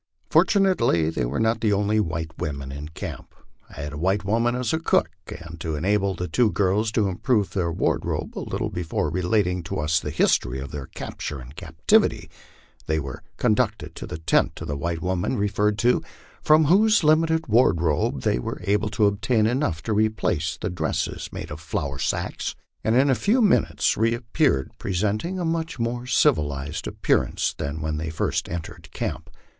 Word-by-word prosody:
Fortunately 120 - +3
they 60 - -1
were - - -2
not 115 0 +1
the 110 - +2
only 105 +2 +2
white 80 -4 -2
women 70 -3 -4
in 70 +2 -6
camp. 80 - -8 0.3
I - - -9
had 75 0 -5
a 75 - -6
white 95 +4 +1
woman 115 +4 +1
as 125 0 -1
cook, - - +2 0.2
and 85 -1 -9
to 80 -2 -2
enable 100 +4 +1
the 90 - -3
two 110 +8 +3
girls 105 +3 +1
to 110 -4 +2
improve 100 +2 0
their 85 -3 -1
wardrobe - - -1
a - - -3
little - - -3
before 80 -3 -2
relating 90 +1 +1
to 80 - -5
us 75 +2 +1
the 75 - -5
history 65 -4 +1
of 70 +1 -7
their 70 -3 -6
capture 75 - -6
and 65 +3 -11
captivity, 80 -1 +1 0.6
they 80 0 +1
were 70 -3 -6 0.2
con - - +3
ducted - - -1
to - - -8
the - - -5
tent 80 - +1
of - - -6
the 70 - -1
white 85 +4 -3
woman 90 +6 -1
referred 105 0 +1
to, 120 +4 +3 0.4
from 155 +1 +5
whose 205 +5 +4
limited 160 +1 +3
ward 115 -6 +4
robe 80 -3 0
they - - +1
were - - -4
able 105 +3 +1
to 105 0 +2
obtain 110 +2 +2
enough 120 - 0
to 110 - -1
replace 105 -7 0
the 105 - -3
dresses 90 - -2
made - - -7
of 75 - -6
flour 75 -5 -3
sacks, - - -2 0.3
and 110 - +2
in 135 +2 +4
a - - +5
few 210 - +2
minutes 210 -5 +3
reappeared 115 - +1
presenting 105 - -1
a 180 - -2
much 165 -1 -2
more 120 +1 -2
civilized 75 - +1
ap - - -8
pearance - - +1
than 75 +1 -4
when 80 0 -2
they 80 +1 -3
first 80 - -1
entered 85 -2 -7
camp. - - -4
100 Hz, 185 wpm, -24 LUFS, 80-115 Hz, 0.6 s, from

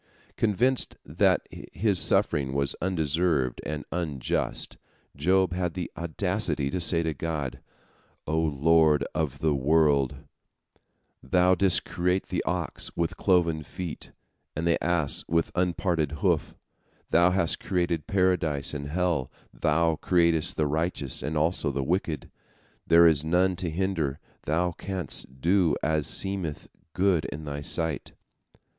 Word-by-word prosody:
Convinced 120 +5 +1
that - - +2
his 95 +2 -1
suffering 65 -2 +1
was 70 -1 0
undeserved 80 -6 0
and 75 0 -5
unjust, 80 -7 -2 0.4
Job 95 -1 +2
had 90 -2 -2
the 90 -2 -4
audacity 85 -3 -1
to 90 - -2
say 85 0 +4
to 80 -1 -1
God: 75 -3 -4 0.7
"O 80 +1 0
Lord 80 -1 +3
of 75 -4 -2
the 80 +1 +1
world, 70 -1 +2 1.1
Thou 90 +7 +3
didst 95 0 +3
create 90 +2 -1
the - - -1
ox - - -2
with 85 -1 -1
cloven 85 -5 +2
feet 85 +4 -7 0.4
and 80 - -2
the 85 0 +1
ass 85 -4 0
with 85 0 0
unparted 85 -4 0
hoof, 80 - 0 0.6
Thou 85 +2 +5
hast 90 -3 0
created 85 -4 -1
Paradise 90 -8 +1
and 70 -1 -5
hell, 85 -5 -1 0.2
Thou 80 +1 +1
createst 85 -1 +2
the 75 - +1
righteous 75 -2 -1
and 75 +1 -3
also 80 0 +1
the 70 0 -2
wicked. 80 -2 -2 0.6
There 85 0 +7
is 80 -3 +4
none 90 +3 +2
to 90 -1 -3
hinder, 80 -5 -1 0.3
Thou 85 +4 +1
canst 85 -8 -5
do 85 -3 +3
as 80 -2 0
seemeth 95 -6 -2 0.2
good 90 -4 +2
in 75 +1 -6
Thy 70 0 -5
sight." 80 0 -1
80 Hz, 130 wpm, -27 LUFS, 75-90 Hz, 1.1 s, There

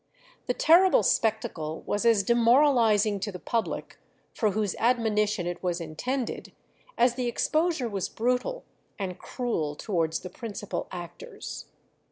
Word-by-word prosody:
The 245 - 0
terrible 360 +4 +5
spectacle 175 -8 0
was 205 +3 0
as 220 -4 +4
demoralizing 235 -3 +4
to 205 +2 -3
the 185 - -7
public, 230 +5 -3 0.3
for 215 - +1
whose 205 -1 -1
admonition 215 -5 +1
it 175 0 -4
was 180 -1 -1
intended, 235 - -4 0.4
as 245 0 +4
the 250 0 -2
exposure 310 +3 0
was 200 -4 -3
brutal 250 - -1 0.3
and 185 -3 -4
cruel 165 - -3
towards 165 -4 -1
the 180 - -7
principal 210 -2 -5
actors. 295 - -8
220 Hz, 130 wpm, -27 LUFS, 185-245 Hz, 0.4 s, terrible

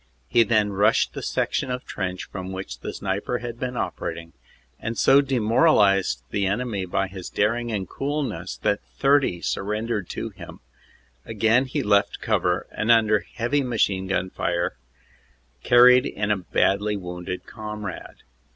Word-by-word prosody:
He 120 - +4
then 110 -2 +2
rushed 100 +2 +2
the - - -6
section - - -1
of 125 0 -4
trench 95 -2 -4
from 95 -1 -6
which 95 0 -6
the - - -5
sniper 100 +5 -2
had 120 -1 -7
been 125 -1 -3
operating, 85 0 -4 0.5
and 115 +1 -4
so 135 +1 +6
demoralized 110 - +3
the 100 -2 0
enemy 100 -1 -2
by 95 +2 0
his 95 -1 -8
daring 115 +3 0
and 100 -3 -3
coolness 135 - -3
that - - +1 0.2
30 135 -11 +2
surrendered 105 0 -2
to - - -4
him, - - -11 0.6
Again 115 +3 +2
he 135 +2 -2
left 100 -2 +2
cover - - 0
and 110 - -3
under 110 -2 +5
heavy 120 +7 -1
machine 100 -7 0
gun 95 0 -1
fire 85 -4 -1 0.9
carried 125 +2 +6
in 105 0 -2
a 105 - +2
badly 100 +3 +1
wounded 90 0 -6
comrade. 105 -3 -7
105 Hz, 145 wpm, -24 LUFS, 95-120 Hz, 0.9 s, so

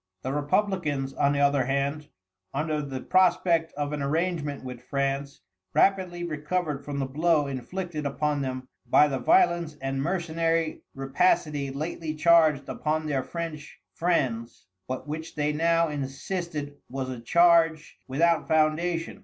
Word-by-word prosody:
The 130 - -2
Republicans, 145 -3 0
on 140 - +2
the 140 - 0
other 140 -2 +3
hand, 140 +3 -1 0.5
under 150 +1 -1
the 135 -3 -5
prospect 175 -3 +3
of 145 0 -3
an 150 - -3
arrangement 150 -1 -1
with 125 -1 -7
France, 140 +1 -2 0.3
rapidly 185 -3 +2
recovered 155 -2 -2
from 145 0 -5
the 135 - 0
blow 155 +3 +2
inflicted 150 +5 -4
upon 145 +1 -1
them 130 -1 -4 0.2
by 150 - +6
the 135 -2 -2
violence 175 - +3
and 135 0 -2
mercenary 165 -1 0
rapacity 140 +1 +1
lately 155 +3 -4
charged 155 -3 +4
upon 155 +1 -2
their 140 -3 0
French 160 -1 -6
friends, 125 -9 -1 0.2
but 130 +3 -5
which 160 +2 -6
they 150 0 0
now 165 +2 +2
insisted, 145 +1 -4
was 130 0 -4
a 125 - -6
charge 165 +3 +3
without 165 +5 +2
foundation. 165 +2 +1
150 Hz, 135 wpm, -27 LUFS, 140-170 Hz, 0.5 s, by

